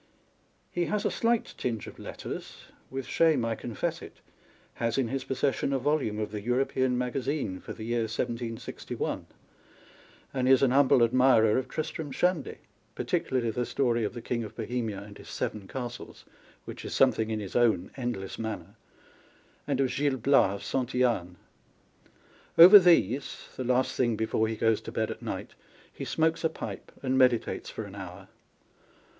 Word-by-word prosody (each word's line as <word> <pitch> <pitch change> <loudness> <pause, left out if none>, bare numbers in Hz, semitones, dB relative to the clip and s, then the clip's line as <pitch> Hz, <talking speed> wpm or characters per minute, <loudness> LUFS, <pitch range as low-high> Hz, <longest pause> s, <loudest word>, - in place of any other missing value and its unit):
He 175 0 0
has 210 +2 -1
a - - +2
slight 230 0 0
tinge 115 -4 -2
of - - -11
letters, - - -7 0.3
with 135 -1 -4
shame 155 -8 +3
I 115 - 0
confess 115 0 -3
it - - -11
â€" - - -27 0.6
has 115 +1 0
in 130 -4 +1
his 135 +1 -2
possession 135 +1 0
a 135 - +2
volume 135 -5 0
of 105 -1 -3
the 105 -1 -4
European 125 +2 +1
Maga 125 +2 -1
zine 130 -8 -3
for - - -7
the 110 - -9
year 120 +1 0
1761, 115 0 -4 1.1
and 130 -1 +1
is 135 0 +6
an 130 - +4
humble 135 -2 +5
admirer 115 -2 +4
of 130 0 0
Tristram 155 -1 -4
Shandy 180 +2 0 0.4
(particularly 120 -3 0
the 125 +3 -1
story 120 -2 0
of 105 - -3
the 120 - -7
King 120 -1 -2
of 110 - -9
Bohemia 115 -4 -3
and 100 0 -12
his - - -12
Seven 105 -3 -4
Castles, 125 0 -7 0.4
which - - -8
is - - -5
something 110 0 +3
in 110 -1 -1
his 100 -3 -7
own 115 -7 +2
endless 120 -7 -4
manner) 110 -1 -5 0.9
and - - 0
of 135 -2 +1
Gil 140 -1 +1
Bias 110 -6 +2
of 130 -2 +1
Santittane. 120 -9 0 1.2
Over 185 +5 +12
these 165 -7 +2
(the 130 - -3
last 125 +1 +1
thing 120 -3 +1
before 110 0 0
he 110 - -2
goes 115 0 +2
to - - -8
bed - - -1
at - - -8
night) - - -5 0.4
he - - -6
smokes 160 +1 +1
a 160 - +3
pipe, 160 - -7
and 130 0 +1
meditates 125 -3 +2
for 110 - -6
an 100 -2 -10
hour. 95 -1 -9
125 Hz, 170 wpm, -28 LUFS, 110-135 Hz, 1.2 s, Over